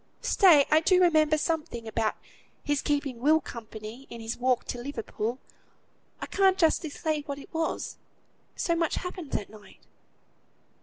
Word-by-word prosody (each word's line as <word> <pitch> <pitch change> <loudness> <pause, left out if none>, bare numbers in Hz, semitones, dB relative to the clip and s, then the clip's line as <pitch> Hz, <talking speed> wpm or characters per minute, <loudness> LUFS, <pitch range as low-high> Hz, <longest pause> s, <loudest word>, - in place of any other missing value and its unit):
"Stay! 330 -8 +6
I 310 - +7
do 365 +2 +4
remember 310 -4 +4
something 305 -8 -2
about 220 0 0 0.5
his 290 -1 0
keeping 285 -4 -1
Will 305 +5 +4
company, 230 -1 -9
in 235 - -8
his 225 +1 -4
walk 250 0 +1
to 245 - -5
Liverpool. 240 -2 -4 0.8
I - - -4
can't 385 -1 +3
justly 325 -2 +2
say 305 +1 -2
what 285 -1 -6
it 280 - -13
was, 325 0 -2 0.6
so 340 - 0
much 330 -2 0
happened 360 -4 -5
that 205 - -2
night." 210 -1 -16
290 Hz, 150 wpm, -28 LUFS, 235-325 Hz, 0.8 s, I